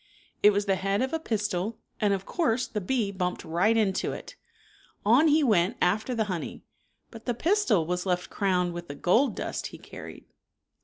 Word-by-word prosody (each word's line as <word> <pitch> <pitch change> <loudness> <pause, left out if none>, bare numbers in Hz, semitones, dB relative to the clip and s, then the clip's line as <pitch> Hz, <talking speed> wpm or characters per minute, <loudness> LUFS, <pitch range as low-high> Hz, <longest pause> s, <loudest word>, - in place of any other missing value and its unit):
It 210 - +8
was 205 0 +1
the 195 -2 +1
head 195 +5 0
of 265 - -3
a 325 - 0
pistil, 210 - -2 0.2
and 210 -1 +2
of 195 -1 -1
course 255 -8 0
the 215 -3 -4
bee 220 0 0
bumped 180 -2 -3
right 180 +8 +2
into 195 -4 +1
it. - - -9 0.7
On 245 +9 +6
he 305 0 +4
went 210 -3 +2
after 215 +7 +1
the 225 - +1
honey, 185 -6 -5 0.5
but 225 -2 -11
the 245 - 0
pistil 320 - +2
was 180 +2 -2
left 180 -1 -1
crowned 180 -3 +1
with 175 0 -7
the 145 - -7
gold 225 - +2
dust - - -3
he - - -11
carried. - - -11
205 Hz, 190 wpm, -27 LUFS, 180-235 Hz, 0.7 s, It